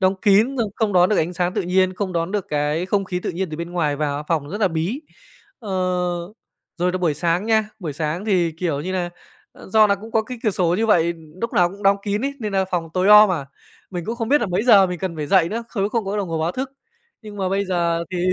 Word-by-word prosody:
đóng 190 Hz, 0 st, +3 dB
kín, 220 Hz, +6 st, +4 dB
xong 220 Hz, -4 st, 0 dB
không 220 Hz, -3 st, 0 dB
đón 180 Hz, -1 st, +5 dB
được 210 Hz, -, +1 dB
ánh 170 Hz, +3 st, 0 dB
sáng 180 Hz, +1 st, -1 dB
tự -, -, 0 dB
nhiên, 185 Hz, +1 st, +2 dB
không 190 Hz, -1 st, -3 dB
đón 170 Hz, +3 st, -2 dB
được 205 Hz, -3 st, -2 dB
cái 150 Hz, +4 st, -1 dB
không 195 Hz, 0 st, 0 dB
khí 180 Hz, -1 st, -3 dB
tự -, -, -3 dB
nhiên 180 Hz, 0 st, -3 dB
từ 155 Hz, -, -5 dB
bên 170 Hz, +1 st, -5 dB
ngoài 150 Hz, -5 st, 0 dB
vào, 145 Hz, -1 st, -2 dB
phòng 155 Hz, -4 st, 0 dB
rất 205 Hz, +7 st, -5 dB
là 195 Hz, -, +4 dB
bí. 170 Hz, -, -2 dB, 0.6 s
Ờ, 215 Hz, -6 st, -8 dB, 1.1 s
rồi 180 Hz, +1 st, +1 dB
là 185 Hz, -, -1 dB
buổi 165 Hz, -5 st, +1 dB
sáng 175 Hz, +5 st, 0 dB
nha, 220 Hz, -1 st, +2 dB
buổi 165 Hz, -8 st, -5 dB
sáng 155 Hz, +5 st, -3 dB
thì, 180 Hz, -6 st, +1 dB
kiểu 160 Hz, -3 st, -2 dB
như 185 Hz, +4 st, -4 dB
là, 180 Hz, -2 st, -2 dB, 0.4 s
ờ, -, -, -14 dB
do 215 Hz, +1 st, +5 dB
là 200 Hz, -, +2 dB
cũng 220 Hz, +3 st, -11 dB
có 225 Hz, -, +2 dB
cái 245 Hz, +3 st, -8 dB
cửa 215 Hz, -, +2 dB
sổ 175 Hz, -2 st, +1 dB
như 225 Hz, +4 st, 0 dB
vậy, 170 Hz, -5 st, +3 dB, 0.3 s
lúc 230 Hz, -, -3 dB
nào 175 Hz, -1 st, +4 dB
cũng 200 Hz, +2 st, -12 dB
đóng 195 Hz, 0 st, +4 dB
kín 205 Hz, 0 st, -1 dB
ấy 280 Hz, -, -1 dB
nên 210 Hz, -3 st, -3 dB
nà 190 Hz, -1 st, +2 dB
phòng 170 Hz, -2 st, -2 dB
tối 185 Hz, +1 st, +2 dB
om 210 Hz, -1 st, +9 dB
à, 140 Hz, -6 st, -3 dB, 0.4 s
mình 175 Hz, -3 st, -5 dB
cũng 230 Hz, +5 st, -4 dB
không 230 Hz, -2 st, -3 dB
biết 290 Hz, +3 st, +4 dB
là 235 Hz, -, 0 dB
mấy 180 Hz, +2 st, 0 dB
giờ 205 Hz, -6 st, +6 dB
mình 180 Hz, -1 st, -4 dB
cần 175 Hz, -2 st, -4 dB
phải 150 Hz, -, -3 dB
dậy 175 Hz, -1 st, +4 dB
nữa, 230 Hz, +2 st, -4 dB
không 200 Hz, -5 st, -3 dB
nếu 200 Hz, -, +1 dB
không 225 Hz, 0 st, -1 dB
có 195 Hz, +2 st, -3 dB
đồng 200 Hz, -3 st, -2 dB
hồ 165 Hz, -1 st, -2 dB
báo 165 Hz, +3 st, 0 dB
thức. 265 Hz, +1 st, -4 dB, 0.5 s
Nhưng 210 Hz, -1 st, -10 dB
mà 190 Hz, -2 st, -1 dB
bây 195 Hz, +1 st, 0 dB
giờ, 170 Hz, -3 st, 0 dB
thì 185 Hz, -, -3 dB
185 Hz, 280 wpm, -21 LUFS, 170-210 Hz, 1.1 s, om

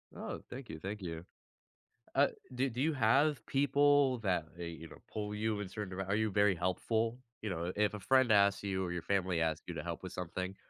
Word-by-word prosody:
Oh, -, -, -5 dB
thank 130 Hz, 0 st, -8 dB
you, 80 Hz, -, -6 dB
thank 100 Hz, +4 st, -5 dB
you. 85 Hz, -1 st, -5 dB, 0.9 s
Uh, 140 Hz, +1 st, +5 dB, 0.3 s
do 130 Hz, +2 st, +1 dB
do 120 Hz, +3 st, -4 dB
you 160 Hz, +3 st, +2 dB
have 140 Hz, +5 st, +3 dB
people 140 Hz, -1 st, +4 dB
that, 90 Hz, -6 st, 0 dB
hey, 85 Hz, -1 st, -5 dB
you 80 Hz, 0 st, -9 dB
know, -, -, -13 dB
pull 105 Hz, -1 st, -3 dB
you 105 Hz, -1 st, -1 dB
in 100 Hz, -, -4 dB
certain 95 Hz, -2 st, -5 dB
dire 95 Hz, -1 st, -3 dB
are 100 Hz, +2 st, +1 dB
you 110 Hz, -1 st, +1 dB
very 100 Hz, -1 st, +4 dB
helpful? 110 Hz, +7 st, 0 dB, 0.2 s
You 105 Hz, -, -2 dB
know, 85 Hz, -1 st, -2 dB
i 90 Hz, -, -2 dB
if 105 Hz, 0 st, +3 dB
a 105 Hz, -, -5 dB
friend 130 Hz, +2 st, +4 dB
asks 100 Hz, -1 st, +4 dB
you, 95 Hz, -1 st, -1 dB
or 85 Hz, -, -3 dB
your 90 Hz, -2 st, -3 dB
family 95 Hz, -3 st, +1 dB
asks 80 Hz, -1 st, 0 dB
you -, -, -4 dB
to -, -, -4 dB
help -, -, -5 dB
with -, -, -6 dB
something, 90 Hz, +2 st, -4 dB
100 Hz, 230 wpm, -34 LUFS, 90-120 Hz, 0.9 s, Uh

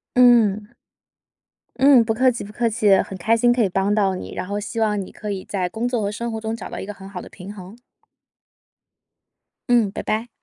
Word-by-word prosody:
嗯。 225 Hz, -5 st, +4 dB, 1.1 s
嗯， 270 Hz, -3 st, +7 dB
不 225 Hz, 0 st, -1 dB
客 255 Hz, +3 st, +3 dB
气 245 Hz, -, -4 dB
不 205 Hz, -, -10 dB
客 235 Hz, +2 st, 0 dB
气。 215 Hz, -3 st, +3 dB
很 190 Hz, -, -7 dB
开 220 Hz, +6 st, +2 dB
心 240 Hz, +1 st, +4 dB
可 240 Hz, -1 st, +2 dB
以 200 Hz, -, +1 dB
帮 195 Hz, +3 st, 0 dB
到 195 Hz, -3 st, +2 dB
你， 185 Hz, -, -7 dB
然 -, -, -4 dB
后 205 Hz, +2 st, -3 dB
希 225 Hz, +2 st, -4 dB
望 210 Hz, -2 st, +1 dB
你 190 Hz, -, -9 dB
可 210 Hz, -1 st, -6 dB
以 190 Hz, -2 st, -5 dB
在 185 Hz, -3 st, -2 dB
工 225 Hz, +5 st, -3 dB
作 245 Hz, -2 st, -1 dB
和 200 Hz, -1 st, -1 dB
生 235 Hz, +2 st, -4 dB
活 220 Hz, -1 st, -5 dB
中 220 Hz, 0 st, -3 dB
找 225 Hz, -, -7 dB
到 -, -, -7 dB
一 -, -, -5 dB
个 210 Hz, -, -6 dB
很 195 Hz, -1 st, -12 dB
好 190 Hz, -2 st, -7 dB
的 -, -, -11 dB
平 195 Hz, +2 st, -10 dB
衡。 195 Hz, +3 st, -12 dB, 1.9 s
嗯， 230 Hz, -5 st, +3 dB
拜 -, -, -5 dB
拜。 220 Hz, +3 st, -2 dB
215 Hz, 240 characters per minute, -22 LUFS, 200-235 Hz, 1.9 s, 嗯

